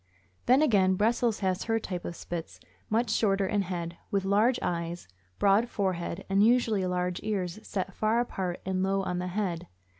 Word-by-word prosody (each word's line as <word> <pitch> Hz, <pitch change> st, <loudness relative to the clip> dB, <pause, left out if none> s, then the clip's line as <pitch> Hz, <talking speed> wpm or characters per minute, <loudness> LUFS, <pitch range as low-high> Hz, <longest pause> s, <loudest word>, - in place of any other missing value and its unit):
Then, 260 Hz, +5 st, +6 dB
again, 195 Hz, -9 st, +4 dB
Brussels 225 Hz, +2 st, +1 dB
has 185 Hz, -1 st, 0 dB
her 225 Hz, 0 st, +1 dB
type 180 Hz, -5 st, -5 dB
of 170 Hz, -, -5 dB
Spits, 170 Hz, -1 st, -6 dB, 0.3 s
much 225 Hz, +1 st, +1 dB
shorter 200 Hz, -3 st, +2 dB
in 205 Hz, +1 st, +1 dB
head, 175 Hz, -2 st, -4 dB
with 195 Hz, -1 st, 0 dB
large 215 Hz, +6 st, +3 dB
eyes, 170 Hz, 0 st, -3 dB, 0.3 s
broad 205 Hz, +4 st, +3 dB
forehead, 185 Hz, -3 st, -2 dB
and 195 Hz, +1 st, +3 dB
usually 225 Hz, -5 st, +3 dB
large 180 Hz, 0 st, -1 dB
ears 195 Hz, -3 st, -2 dB
set 195 Hz, -2 st, -4 dB
far 220 Hz, +4 st, +1 dB
apart 190 Hz, -7 st, -3 dB
and 185 Hz, 0 st, -1 dB
low 195 Hz, +1 st, +1 dB
on 180 Hz, -1 st, -2 dB
the 180 Hz, -, -3 dB
head. 180 Hz, -3 st, -2 dB
195 Hz, 175 wpm, -29 LUFS, 180-215 Hz, 0.3 s, Then